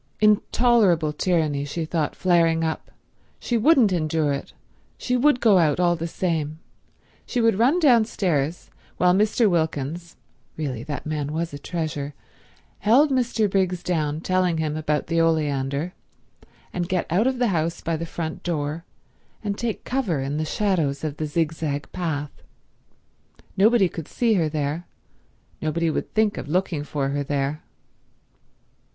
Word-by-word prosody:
Intolerably 210 -6 +3
tyranny, 155 -4 0
she 160 +3 -3
thought, 155 -2 -1
flaring 165 -2 +3
up. 160 -1 -3 0.5
She 240 - -2
wouldn't 235 - +4
endure 155 -3 0
it; 140 - -5 0.5
she 250 - -1
would 250 +1 +3
go 210 -6 +5
out 155 -2 +2
all 175 -1 +3
the 165 0 -4
same; 160 -3 -2 0.7
she 250 - -2
would 225 -3 +3
run 270 +10 +4
downstairs 195 - +2 0.3
while 180 0 +4
Mr. 215 +3 +3
Wilkins—really 160 - -4
that 145 -2 -5
man 150 -2 -3
was 165 0 -2
a 145 - -6
treasure—held 170 - -2
Mr. 240 -4 +1
Briggs 185 -2 0
down 155 -3 -1
telling 185 -2 +1
him 155 -1 -1
about 150 -1 -1
the 165 0 +1
oleander, 150 0 0 0.8
and 175 -1 -2
get 185 -2 0
out 200 +8 +3
of 260 -1 0
the 245 -2 +2
house 165 -2 -1
by 165 -1 -1
the 160 - -4
front 160 -1 -5
door, 155 -1 -3 0.6
and 205 -1 -2
take 230 0 -3
cover 240 - -1
in 135 +2 -2
the 155 - -1
shadows 160 -7 0
of 150 -2 -3
the 155 - -2
zigzag 155 -2 -2
path. 150 -5 -3 1.2
Nobody 210 0 +4
could 165 -2 -7
see 235 -2 +1
her 165 -6 +2
there; 150 +2 -3 0.7
nobody 160 +1 0
would - - -3
think 215 -1 +2
of - - -7
looking 170 -2 0
for 145 -2 -2
her 145 +1 -1
there. 140 +1 -2
165 Hz, 145 wpm, -24 LUFS, 150-195 Hz, 1.2 s, go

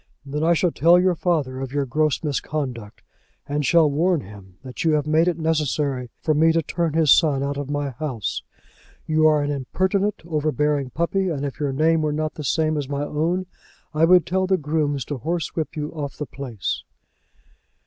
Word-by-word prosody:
"Then 150 +2 -3
I 170 +1 +4
shall 175 +1 +1
tell 170 +3 +5
your 185 0 +3
father 155 -7 -1
of 135 -1 -5
your 145 0 0
gross 150 +4 0
misconduct, 135 -7 -4 0.4
and 145 +1 -1
shall 160 +3 +5
warn 160 +3 +1
him 95 -3 -13
that 130 -1 -6
you 160 -2 +3
have 150 -1 +1
made 155 +3 +3
it 175 - +1
necessary 150 -5 -1
for 155 - +2
me 160 +2 +4
to 165 0 +1
turn 165 +1 -1
his 160 -4 +4
son 145 -5 +4
out 140 0 -2
of 140 -1 -5
my 145 -1 -2
house. 130 -5 -4 0.6
You 155 0 +3
are 150 -1 +3
an 145 - -1
impertinent, 190 +9 -1
overbearing 150 -3 0
puppy, 180 +6 0
and 145 -4 -2
if 140 +1 -6
your 145 -2 0
name 160 +4 +2
were 150 -1 0
not 155 0 -2
the 150 - -7
same 155 +3 +1
as 145 -2 -3
my 145 0 -2
own, 165 +5 -1 0.5
I 155 +2 +4
would 180 -1 +5
tell 185 +2 0
the 190 0 +3
grooms 150 -4 -1
to 145 -3 -5
horsewhip 165 +1 -3
you 150 -1 -4
off 145 -3 -6
the 150 - -3
place." 125 -6 -4
150 Hz, 195 wpm, -23 LUFS, 140-165 Hz, 0.6 s, tell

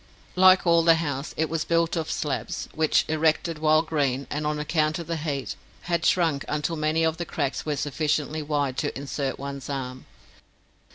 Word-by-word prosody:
Like 185 0 +6
all 170 -1 +5
the 165 0 +6
house, 145 -3 -3
it 160 - +1
was 165 -1 -1
built 165 0 +1
of 160 -2 -2
slabs, 145 -3 -3
which, 155 -1 +2
erected 155 +1 +1
while 155 0 +4
green, 140 -4 -1
and 150 +1 -2
on 150 0 -1
account 155 +1 0
Of 170 - -6
the 165 +1 -3
heat, 145 -3 -3 0.3
had 170 -1 0
shrunk 160 -6 +2
until 150 +2 -1
many 155 +1 +1
of 160 0 +1
the 175 - -2
cracks 145 -2 -3
were 150 - 0
sufficiently 150 +1 -1
wide 145 -3 -1
to - - -2
insert 140 -1 -3
one's 140 -1 -6
arm. 130 -2 -5
155 Hz, 180 wpm, -25 LUFS, 145-165 Hz, 0.3 s, Like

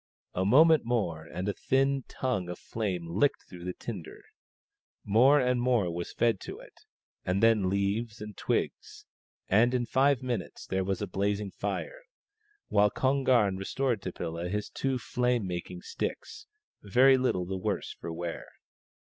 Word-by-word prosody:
A 95 - 0
moment 155 +7 +6
more 100 -10 -1
and 90 +3 -5
a 100 - 0
thin 135 +2 +1
tongue 105 -9 -2
of 90 - -5
flame 95 -6 -3
licked 100 +12 +1
through 90 -1 -10
the 90 - -3
tinder; 95 -9 -8 0.8
more 125 +8 +5
and 125 -1 +1
more 120 -9 +2
was 85 0 -4
fed 115 -4 +1
to - - -7
it, - - -14 0.5
and 95 +3 0
then 110 -5 +4
leaves 100 +3 -1
and 105 -1 -8
twigs; - - -3 0.4
and 120 +5 +4
in 120 -1 0
five 135 +1 +2
minutes 120 -7 -4
there 95 0 -1
was 95 -1 -2
a - - -3
blazing 100 0 -1
fire, - - -4 0.7
while 105 0 +4
Kon 135 +5 +1
gam 105 -8 +3
restored 120 +3 -1
to 95 - -4
Pilla 85 +1 -4
his 105 +2 -3
two 135 -1 -1
fiame 125 -1 0
making 90 0 -5
sticks, 425 - -5 0.3
very 130 +7 +5
little 125 -9 0
the 95 +2 -4
worse 100 -2 -2
for 85 - -7
wear. 85 0 -5
105 Hz, 160 wpm, -29 LUFS, 95-125 Hz, 0.8 s, moment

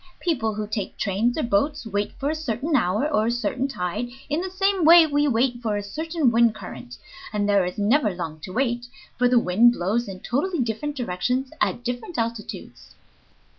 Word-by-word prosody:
People 235 - -1
who 210 0 -3
take 205 -2 -4
trains 215 +6 0
or 310 - 0
boats 255 +6 0
wait 205 -1 -2
for 285 +2 -2
a - - -1
certain 300 0 -2
hour 215 +4 +2
or 215 +1 +2
a - - +2
certain 240 +3 -1
tide, 180 -2 -3 0.2
in 300 +3 0
the 375 - -4
same 385 0 +1
way 335 +1 +9
we 290 -1 +1
wait 245 -1 +1
for 215 -3 -1
a 205 - -3
certain 315 - 0
wind 230 -1 +4
current, 125 - -9 0.3
and 205 -1 0
there 200 -2 +4
is 180 - -5
never 215 +4 +3
long 165 -4 -5
to 185 - -8
wait, 240 +1 -1 0.3
for 245 +1 +3
the 250 - +4
wind 230 +3 +5
blows 215 +5 -1
in 190 -1 -7
totally 315 +9 -1
different 250 +5 -2
directions 250 +3 -2
at 240 - 0
different 250 - -4
altitudes." 230 -1 -5
235 Hz, 195 wpm, -24 LUFS, 205-285 Hz, 0.3 s, way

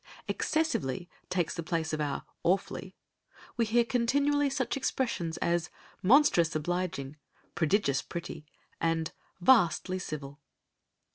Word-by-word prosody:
"Excessively" 175 - 0 0.2
takes 175 -3 0
the - - -4
place 160 0 -2
of 155 - -1
our 145 -2 -2 0.2
"awfully," 185 +3 -1 0.6
we 235 - +2
hear 235 +2 +3
continually 280 +4 +2
such 265 -2 -1
expressions 235 -11 -1
as 170 0 0 0.3
"monstrous 190 - +5
obliging," 155 -3 -2 0.4
"prodigious 160 -4 +2
pretty," 165 -3 -7 0.3
and 165 -1 0 0.3
"vastly 185 -3 +4
civil." 145 -4 -6
175 Hz, 110 wpm, -30 LUFS, 160-235 Hz, 0.6 s, monstrous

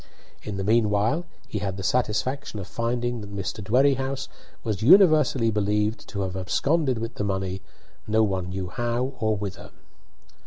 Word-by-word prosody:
In 105 -2 -5
the 95 - -2
meanwhile 110 - +2 0.2
he 105 - -3
had 95 -1 -3
the 95 - -5
satisfaction 125 +2 -1
of 95 - -5
finding 120 +3 -2
that 100 -1 -9
Mr. 95 +2 -4
Dwerrihouse 135 +4 +1 0.3
was 110 -4 -2
universally 150 - +6
believed 105 +1 0
to 100 -1 -3
have 95 -1 -3
absconded 130 - +1
with 115 +1 -4
the 105 - -3
money, 95 -1 -2 0.5
no 110 +1 +3
one 95 -3 -1
knew 95 -1 -4
how 120 +6 -1
or 110 -1 +1
whither. 100 -1 -6
110 Hz, 155 wpm, -25 LUFS, 100-125 Hz, 0.5 s, universally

